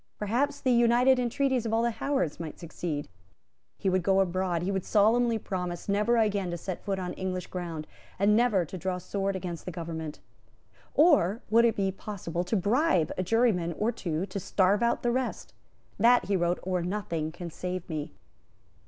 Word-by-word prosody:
Perhaps 270 Hz, +8 st, -1 dB
the 255 Hz, -, +2 dB
united 240 Hz, +2 st, +4 dB
entreaties 250 Hz, +1 st, +1 dB
of 225 Hz, -, -2 dB
all 230 Hz, -, +2 dB
the 235 Hz, -, +2 dB
Howards 225 Hz, -, -1 dB
might 160 Hz, -3 st, -6 dB
succeed. 160 Hz, -3 st, -4 dB, 0.7 s
He -, -, -3 dB
would 185 Hz, 0 st, +2 dB
go 195 Hz, +2 st, +3 dB
abroad; 185 Hz, -2 st, 0 dB
he 190 Hz, -, -1 dB
would 190 Hz, -2 st, -1 dB
solemnly 230 Hz, +2 st, +3 dB
promise 180 Hz, -4 st, -4 dB
never 210 Hz, +4 st, +2 dB
again 205 Hz, -4 st, +1 dB
to 175 Hz, -, -3 dB
set 185 Hz, +1 st, -6 dB
foot 195 Hz, -2 st, -1 dB
on 180 Hz, -1 st, -4 dB
English 185 Hz, -1 st, -3 dB
ground, 170 Hz, -4 st, -5 dB, 0.3 s
and 205 Hz, +2 st, +4 dB
never 220 Hz, -6 st, +3 dB
to 185 Hz, +4 st, -8 dB
draw 185 Hz, +1 st, -2 dB
sword 195 Hz, +2 st, -2 dB
against 180 Hz, -3 st, -5 dB
the 180 Hz, -, -4 dB
government. 160 Hz, -2 st, -6 dB, 0.8 s
Or 270 Hz, -, +4 dB
would 230 Hz, +1 st, +6 dB
it 230 Hz, -, +2 dB
be 195 Hz, -1 st, 0 dB
possible 180 Hz, -4 st, -4 dB
to 200 Hz, -, -1 dB
bribe 205 Hz, -, +2 dB
a -, -, -1 dB
juryman 185 Hz, -4 st, +2 dB
or 215 Hz, +7 st, 0 dB
two 170 Hz, -6 st, -3 dB
to 200 Hz, +1 st, -5 dB
starve 195 Hz, +2 st, +2 dB
out 235 Hz, 0 st, +1 dB
the 240 Hz, -, +2 dB
rest? 255 Hz, +1 st, -3 dB, 0.5 s
"That," 240 Hz, +3 st, +5 dB
he 200 Hz, -, 0 dB
wrote, 175 Hz, -1 st, +1 dB
"or 185 Hz, -1 st, -1 dB
nothing 170 Hz, -4 st, -3 dB
can 170 Hz, 0 st, -7 dB
save 180 Hz, +1 st, -5 dB
me." 155 Hz, -1 st, -4 dB
190 Hz, 185 wpm, -28 LUFS, 175-230 Hz, 0.8 s, would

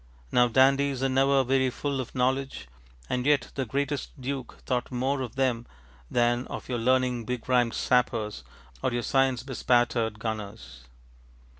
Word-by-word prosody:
ŌĆØ -, -, -28 dB
Now 125 Hz, 0 st, +5 dB
dandies 135 Hz, +2 st, +3 dB
are 135 Hz, -, +2 dB
never 135 Hz, +1 st, +3 dB
very 130 Hz, 0 st, +2 dB
full 140 Hz, +1 st, -2 dB
of 125 Hz, -, -9 dB
knowledge, 130 Hz, -, -1 dB, 0.4 s
and 125 Hz, 0 st, -1 dB
yet 145 Hz, -2 st, +2 dB
the 135 Hz, -3 st, -3 dB
greatest 140 Hz, +3 st, -3 dB
Duke 130 Hz, 0 st, -5 dB
thought 125 Hz, 0 st, -1 dB
more 130 Hz, +2 st, -1 dB
of 125 Hz, -3 st, -5 dB
them 125 Hz, -3 st, 0 dB, 0.4 s
than 120 Hz, +1 st, +1 dB
of -, -, -7 dB
your 125 Hz, -2 st, -2 dB
learning 125 Hz, 0 st, +1 dB
begrimed 125 Hz, -1 st, +1 dB
sappers 115 Hz, -4 st, 0 dB, 0.4 s
or -, -, 0 dB
your 120 Hz, 0 st, -2 dB
science 135 Hz, -2 st, +1 dB
bespattered 120 Hz, -4 st, +1 dB
gunners. 105 Hz, -, -6 dB
125 Hz, 150 wpm, -27 LUFS, 120-135 Hz, 0.4 s, Now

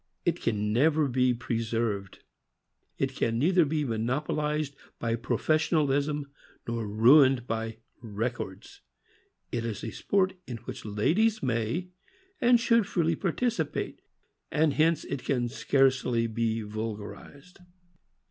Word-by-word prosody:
It -, -, 0 dB
can 105 Hz, -2 st, 0 dB
never 150 Hz, +4 st, +3 dB
be 125 Hz, 0 st, +2 dB
preserved. 115 Hz, -4 st, -2 dB, 0.7 s
It -, -, -1 dB
can 115 Hz, 0 st, 0 dB
neither 170 Hz, +6 st, +4 dB
be 150 Hz, 0 st, -1 dB
monopolized 145 Hz, +5 st, -1 dB, 0.2 s
by 115 Hz, -1 st, -1 dB
pro 120 Hz, +2 st, -2 dB
fessionalism 150 Hz, -2 st, +1 dB, 0.4 s
nor 115 Hz, -2 st, -2 dB
ruined 125 Hz, +4 st, +5 dB
by 115 Hz, -1 st, -3 dB, 0.2 s
"records." 110 Hz, -3 st, -5 dB, 0.7 s
It 120 Hz, -1 st, -2 dB
is 115 Hz, -3 st, -4 dB
a 115 Hz, -, -4 dB
sport 190 Hz, -, +1 dB
in 120 Hz, -, -5 dB
which -, -, -7 dB
ladies 180 Hz, -, +1 dB
may 120 Hz, +8 st, -1 dB, 0.5 s
and 240 Hz, -1 st, +5 dB
should 230 Hz, -3 st, +3 dB
freely 165 Hz, -3 st, +1 dB
participate, 230 Hz, +8 st, -2 dB, 0.5 s
and 150 Hz, -1 st, +2 dB
hence 160 Hz, +1 st, +2 dB
it 125 Hz, -, -5 dB
can 125 Hz, -3 st, 0 dB
scarcely 130 Hz, -2 st, +2 dB
be 115 Hz, 0 st, -1 dB
vulgarized. 110 Hz, -, -7 dB
125 Hz, 120 wpm, -28 LUFS, 115-155 Hz, 0.7 s, ruined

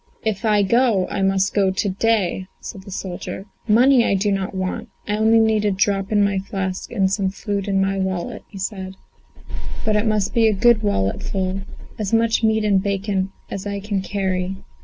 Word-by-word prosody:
"If 220 Hz, 0 st, -1 dB
I 210 Hz, -2 st, +4 dB
go, 220 Hz, -3 st, +3 dB
I 195 Hz, -, -2 dB
must 195 Hz, 0 st, +2 dB
go 195 Hz, -2 st, +3 dB
to 190 Hz, +2 st, -1 dB
day," 195 Hz, -2 st, 0 dB
said 195 Hz, -, -8 dB
the -, -, -10 dB
soldier. 190 Hz, 0 st, -5 dB, 0.2 s
"Money 245 Hz, +3 st, +5 dB
I 200 Hz, -, +2 dB
do 205 Hz, +2 st, +1 dB
not 195 Hz, -1 st, -2 dB
want; 185 Hz, 0 st, -3 dB, 0.2 s
I 210 Hz, -, 0 dB
only 220 Hz, +1 st, +4 dB
need 220 Hz, -1 st, +3 dB
a 210 Hz, -, +3 dB
drop 195 Hz, 0 st, 0 dB
in 205 Hz, -1 st, +4 dB
my 200 Hz, -1 st, +1 dB
flask 190 Hz, -1 st, -4 dB
and 195 Hz, -5 st, +1 dB
some 195 Hz, -1 st, +1 dB
food 200 Hz, 0 st, -3 dB
in 195 Hz, -1 st, +1 dB
my 195 Hz, 0 st, +1 dB
wallet," 190 Hz, -2 st, -3 dB
he 200 Hz, -, -11 dB
said; 190 Hz, -1 st, -5 dB, 0.9 s
"but 215 Hz, -, +2 dB
it 210 Hz, +2 st, +1 dB
must 210 Hz, -2 st, +1 dB
be 230 Hz, -1 st, +4 dB
a 215 Hz, -, +3 dB
good 225 Hz, +2 st, +4 dB
walletful 190 Hz, -, -1 dB, 0.4 s
as 210 Hz, 0 st, -2 dB
much 225 Hz, 0 st, +3 dB
meat 220 Hz, 0 st, +3 dB
and 200 Hz, -2 st, +3 dB
bacon 195 Hz, -1 st, -1 dB, 0.2 s
as 195 Hz, +1 st, -4 dB
I 200 Hz, 0 st, -3 dB
can 200 Hz, -1 st, -2 dB
carry." 190 Hz, -1 st, -2 dB
200 Hz, 195 wpm, -21 LUFS, 190-215 Hz, 0.9 s, Money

